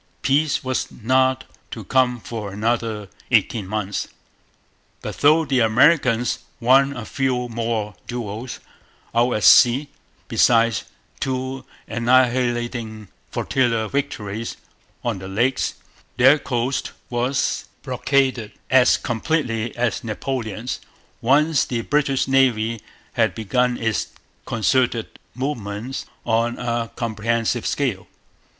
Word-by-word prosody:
Peace 140 +1 +2
was 130 -1 -2
not 130 +2 +1 0.3
to 110 - -7
come 125 +2 +2
for 110 -3 -6
another 110 0 -1 0.2
eighteen 105 -5 +2
months. 100 -1 -2 1.0
But - - -5
though 155 +3 +5
the 135 -2 +1
Americans 120 +1 +3 0.2
won 135 +3 +4
a 120 - -6
few 125 -2 -1
more 115 -2 -2
duels 120 0 -5 0.5
out 120 +2 +3
at 105 - -1
sea, 130 +4 +6 0.4
besides 115 -3 +3 0.3
two 130 0 -3 0.2
annihilating 120 -2 +1 0.2
flotilla 115 -4 0
victories 115 -6 -3 0.5
on 115 -5 -2
the 95 - -8
Lakes, 120 +7 0 0.4
their 130 +4 +6
coast 125 0 -2 0.2
was 125 +3 0 0.2
blockaded 130 -4 0 0.2
as 130 -1 +6
completely 120 -2 -2
as 120 -3 0
Napoleon's, 115 0 -4 0.4
once 145 +4 +3
the 120 -2 -2
British 140 +1 +1
Navy 115 -5 +2 0.3
had - - +1
begun 125 +3 0
its 115 -2 -1 0.4
concerted 115 +1 0 0.2
movements 125 -2 -4 0.2
on 115 +1 +1
a 120 -1 -2
comprehensive 115 +1 -1
scale. 120 -10 -1
120 Hz, 105 wpm, -22 LUFS, 115-130 Hz, 1.0 s, sea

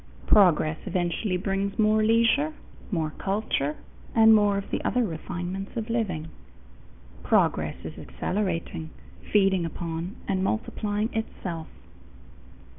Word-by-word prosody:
Progress 160 -6 +4
eventually 180 +2 0
brings 195 +1 -2
more 215 0 +4
leisure, 230 +7 +3 0.4
more 160 -6 -1
culture, 195 -8 -1 0.4
and 225 -1 +8
more 205 -2 +4
of 200 - -5
the - - -1
other 250 - +2
refinements 180 +3 -5
of 225 0 -3
living. 180 -9 -1 0.9
Progress - - +2
is - - -7
accelerating, 165 - -3 0.4
feeding 195 -3 +4
upon 165 +3 -4
and 190 -1 0
multiplying 210 +1 -1
itself. 175 -7 -4
195 Hz, 110 wpm, -26 LUFS, 170-215 Hz, 0.9 s, and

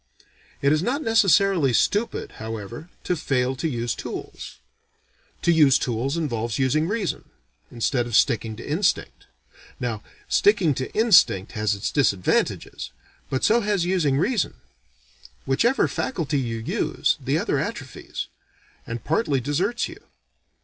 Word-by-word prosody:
It 140 +1 +4
is 155 - +1
not 270 - -1
necessarily 195 - +3
stupid 210 - 0
however, 115 - -6
to 180 - 0
fail 130 -4 0
to 165 - -1
use 120 -3 -2
tools. - - -7 0.9
To 170 - +4
use 150 -5 +5
tools 125 +5 -2
involves 115 -8 -2
using 140 +4 +1
reason, 205 -3 -3 0.4
instead 120 +1 -1
of 120 - -2
sticking 115 -3 +2
to - - -9
instinct. 170 +7 -1 0.5
Now, 115 -4 -3 0.3
sticking 195 -7 +3
to 130 0 -4
instinct 180 - +4
has 105 -2 0
its 100 - -3
disadvantages, 100 -10 0 0.4
but 130 - -2
so 235 +2 +4
has 205 -4 0
using 170 -7 +1
reason. 210 - 0 0.9
Whichever 235 - +2
faculty 155 - -2
you 115 -3 -3
use, 110 - 0
the - - +1
other - - 0
atrophies, - - -5 0.6
and 115 -1 -5
partly 150 -5 +1
deserts 170 - -1
you. - - -12
145 Hz, 130 wpm, -24 LUFS, 120-185 Hz, 0.9 s, use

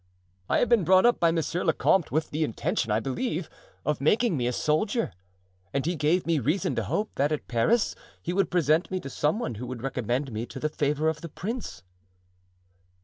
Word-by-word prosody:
I - - +3
have - - +3
been 235 -5 +4
brought 185 +4 +5
up 240 - +4
by 170 - +4
monsieur 165 +2 -1
le - - +3
comte 190 -5 +2
with 155 +2 -1
the 155 +2 0
intention, 115 -4 -1
I 105 - +3
believe, 160 - -3 0.3
of 150 -1 0
making 210 - +3
me 125 -3 0
a - - +1
soldier; 155 - 0 0.6
and 140 - 0
he 175 +2 0
gave 160 +4 +1
me 165 -2 +2
reason 175 - 0
to - - 0
hope 215 +1 -1
that 145 +2 +2
at 155 - -3
Paris 200 - +2 0.3
he 175 - -3
would 195 +1 +1
present 165 -1 +2
me 185 - -2
to 140 - -8
some 150 +9 +1
one 175 - -3
who 125 - -5
would 125 -1 -6
recommend 130 +1 -1
me 110 +2 -4
to - - -8
the 155 - 0
favor 150 +1 0
of 160 -1 -1
the 170 - -7
prince." 185 - -5
155 Hz, 210 wpm, -27 LUFS, 135-185 Hz, 0.6 s, brought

